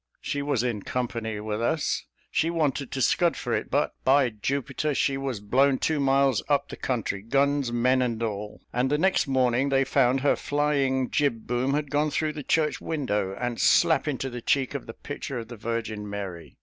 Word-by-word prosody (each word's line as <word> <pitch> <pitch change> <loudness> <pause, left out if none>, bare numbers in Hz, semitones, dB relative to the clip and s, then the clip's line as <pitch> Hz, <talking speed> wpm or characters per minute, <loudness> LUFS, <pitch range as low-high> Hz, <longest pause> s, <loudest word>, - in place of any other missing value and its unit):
She 145 - -3
was 140 -4 0
in 120 -5 -1
company 115 -3 -3
with 105 +1 -3
us; 150 +6 0 0.2
she 160 - +1
wanted 145 -5 -1
to 130 - -1
scud 170 +7 +2
for - - -3
it, - - -1
but, - - +1
by 135 -1 +4
Jupiter, 140 +6 -2
she 135 - +1
was 135 -5 -3
blown 130 +6 +3
two 155 +2 0
miles 135 -2 +3
up 140 -1 +2
the - - -6
country 115 -6 -2
guns, 140 +3 +1
men, 125 +2 +2
and 115 -2 -1
all; 105 -1 -4
and 125 +2 +1
the 150 - +2
next 185 -1 +2
morning 130 0 +2
they 135 0 +3
found 135 -1 +2
her 145 - +3
flying 140 -3 0
jib 140 -7 0
boom 125 +3 0
had 145 -2 -2
gone 150 +1 +2
through 155 +1 -1
the 150 - -6
church 155 +2 +1
window, 105 -11 -1
and 120 -1 -2
slap 160 -4 +4
into 135 -2 -2
the 120 0 -6
cheek 135 0 +1
of 140 - -5
the 115 - -8
picture 140 -2 -6
of 115 -1 -6
the 120 - -7
Virgin 110 -2 -4
Mary. 95 -4 -7
130 Hz, 200 wpm, -26 LUFS, 115-145 Hz, 0.2 s, by